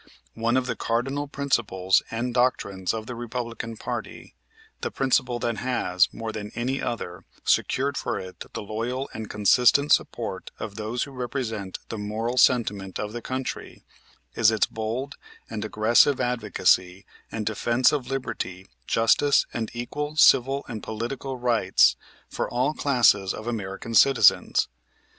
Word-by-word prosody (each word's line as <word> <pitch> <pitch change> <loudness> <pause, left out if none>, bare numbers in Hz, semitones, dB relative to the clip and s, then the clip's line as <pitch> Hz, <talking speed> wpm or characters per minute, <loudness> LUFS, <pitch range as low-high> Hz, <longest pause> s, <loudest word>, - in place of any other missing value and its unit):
One 115 +2 +1
of 130 - +1
the - - -2
cardinal 135 +5 -1
principles 110 -10 +1
and 120 +2 -3
doctrines 100 -7 0
of 110 -1 -4
the 125 - -6
Republican 115 -1 -5
party, - - -6 0.5
the - - -2
principle 125 -2 +1
that 115 -1 -2
has, 95 -8 +1
more 115 -1 -5
than 105 -1 -6
any 130 +4 -1
other, 90 -6 -4 0.2
secured 140 +2 +1
for - - -2
it 95 0 -8
the - - -4
loyal 120 +6 -3
and 110 -1 -6
consistent 125 +7 +4
support - - -1
of 105 - -6
those 110 +3 -3
who 140 - -8
represent 120 -6 -4
the 110 - -5
moral 110 +4 -3
sentiment 105 -7 +2
of 105 0 -4
the 120 - -5
country, 130 +2 -5 0.5
is 110 -2 +4
its 110 -1 +2
bold 115 +6 -4 0.3
and 110 -2 -3
aggressive 110 +6 +3
advocacy 100 -5 +1 0.3
and 110 -1 -3
defense 115 +3 +2
of 140 -4 -2
liberty, 110 -8 -4 0.2
justice, 115 +5 +3
and 115 -2 -3
equal 145 +5 -4
civil 135 -2 +5
and 110 -3 -6
political 125 +4 -4
rights 120 -2 +3 0.3
for - - -3
all 130 +5 0
classes 120 -10 +3
of 110 - -8
American 110 -1 -4
citizens. 135 +3 +5
115 Hz, 145 wpm, -25 LUFS, 110-130 Hz, 0.5 s, civil